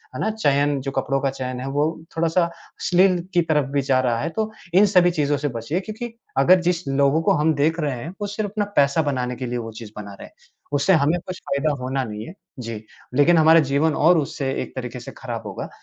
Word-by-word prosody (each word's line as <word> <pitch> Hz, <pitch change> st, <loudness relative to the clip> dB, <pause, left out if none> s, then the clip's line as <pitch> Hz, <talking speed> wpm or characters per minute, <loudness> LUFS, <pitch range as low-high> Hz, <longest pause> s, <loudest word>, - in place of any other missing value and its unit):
है -, -, -5 dB
ना 220 Hz, -, +1 dB
चयन 145 Hz, -8 st, +1 dB
जो 135 Hz, -, -4 dB
कपड़ों 135 Hz, 0 st, -1 dB
का 140 Hz, -, +1 dB
चयन 130 Hz, -1 st, -5 dB
है 135 Hz, -, -5 dB
वो 145 Hz, +2 st, +1 dB, 0.3 s
थोड़ा-सा 165 Hz, +2 st, +2 dB
अश्लील 175 Hz, +2 st, +1 dB, 0.2 s
की 175 Hz, -, +5 dB
तरफ़ 150 Hz, -4 st, +1 dB
भी 140 Hz, -1 st, +1 dB
जा 130 Hz, -1 st, +2 dB
रहा 120 Hz, -2 st, 0 dB
है। -, -, -1 dB
तो 220 Hz, 0 st, -1 dB, 0.2 s
इन 200 Hz, +3 st, +6 dB
सभी 180 Hz, -3 st, +4 dB
चीज़ों 145 Hz, -3 st, 0 dB
से 145 Hz, +1 st, -2 dB
बचिए 145 Hz, +10 st, -2 dB
क्योंकि 220 Hz, +4 st, -6 dB, 0.2 s
अगर 185 Hz, +1 st, +6 dB
जिस 175 Hz, -3 st, -1 dB
लोगों 140 Hz, +3 st, +2 dB
को -, -, +3 dB
हम 155 Hz, +2 st, +2 dB
देख 160 Hz, +4 st, +1 dB
रहे 145 Hz, -5 st, -1 dB
हैं 160 Hz, -, -6 dB
वो 205 Hz, -, -1 dB
सिर्फ़ 205 Hz, 0 st, -3 dB
अपना 210 Hz, 0 st, -1 dB
पैसा 140 Hz, +3 st, +4 dB
बनाने 125 Hz, -4 st, -2 dB
के 130 Hz, -, -5 dB
लिए 120 Hz, 0 st, -3 dB
वो 115 Hz, -1 st, -5 dB
चीज़ 110 Hz, -3 st, -9 dB
बना 100 Hz, -1 st, -7 dB
रहे 100 Hz, -, -11 dB
हैं। -, -, -22 dB, 0.4 s
उससे 145 Hz, +7 st, +3 dB
हमें 155 Hz, +3 st, +3 dB
कुछ 185 Hz, 0 st, -6 dB
फ़ायदा 145 Hz, +2 st, -1 dB
होना 130 Hz, +1 st, -1 dB
नहीं 105 Hz, -2 st, -6 dB
है, 170 Hz, -, -9 dB, 0.3 s
जी। 115 Hz, -2 st, -6 dB, 0.3 s
लेकिन 165 Hz, +5 st, +5 dB
हमारा 160 Hz, +1 st, +7 dB
जीवन 150 Hz, +2 st, +2 dB
और 170 Hz, +2 st, +5 dB
उससे 140 Hz, -1 st, -3 dB
एक -, -, -8 dB
तरीक़े 125 Hz, -1 st, -5 dB
से 120 Hz, -, -9 dB
ख़राब 115 Hz, -3 st, -5 dB
होगा। 95 Hz, -, -6 dB
145 Hz, 235 wpm, -22 LUFS, 130-175 Hz, 0.4 s, हमारा